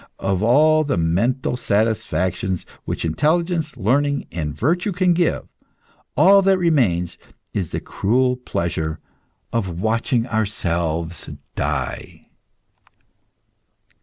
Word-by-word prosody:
Of 95 -1 -1
all 155 +7 +5
the 145 -2 -1
mental 115 +11 +1
satisfactions 95 -5 0 0.2
which - - -3
intelligence, 155 - 0
learning, 140 +6 +1
and 80 -3 -3
virtue 175 - +1
can 180 0 +3
give, 170 -1 0 0.7
all 195 +1 +7
that 195 0 +4
remains 120 - +1 0.3
is 90 -6 -2
the - - -3
cruel 125 +5 +1
pleasure 80 -9 -3 0.5
of 95 -7 -2
watching 115 +3 +1
ourselves 85 -7 -1 0.2
die. 75 -4 -4
115 Hz, 100 wpm, -21 LUFS, -, 0.7 s, all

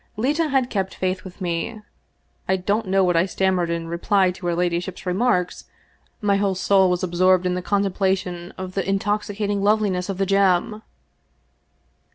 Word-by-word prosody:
Leta 295 +8 +1
had 265 -3 0
kept 190 -2 -2
faith 185 0 -2
with 185 +1 -12
me. 175 +5 -3 0.7
I 190 - +4
don't 200 +3 -1
know 195 +1 +3
what 180 -1 +2
I 170 +3 +3
stammered 185 -2 0
in 170 -1 -3
reply 185 +3 +2
to 180 0 -7
her 170 - 0
ladyship's 175 +2 -2
remarks; 180 -1 0 0.6
my 200 -1 +2
whole 195 -1 0
soul 190 0 +3
was 180 +1 -1
ab 180 - -2
sorbed 185 +1 +4
in 180 - +1
the 180 - -2
contemplation 190 -2 -1
of 185 0 -6
the 195 0 -2
intoxicating 205 0 -1
loveliness 200 -3 +1
of 195 - -3
the 195 - +1
gem. 195 +2 +2
190 Hz, 170 wpm, -22 LUFS, 180-200 Hz, 0.7 s, I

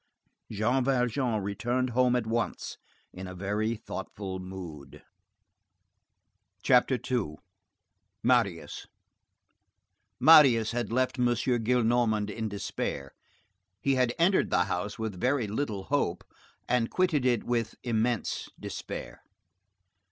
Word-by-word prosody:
Jean 115 +5 +1
Valjean 125 -3 0
returned 120 +6 -1
home 125 +1 +3
at 120 -2 0
once, 115 +1 -3 0.3
in 95 +1 -7
a 90 - -8
very 105 +4 -1
thoughtful 95 -3 -6
mood. 90 -6 -9 1.6
CHAPTER 130 0 +4
II—MARIUS 100 +1 -3 1.3
Marius 135 -9 +7
had 120 -2 -2
left 130 +2 0
M. 125 - +3
Gillenormand 120 -3 +1
in 110 +1 -3
despair. 95 -8 -4 0.7
He 140 - +1
had 125 -2 +1
entered 180 +3 +3
the 90 - +3
house 95 +2 -3
with 110 -5 -4
very 130 -1 +1
little 105 -2 -3
hope, 140 -7 -1 0.4
and 120 -2 +1
quitted 175 -7 +1
it 125 -3 +2
with 115 -2 -1
immense 115 -1 -1
despair. - - -7
115 Hz, 105 wpm, -29 LUFS, 100-125 Hz, 1.6 s, Marius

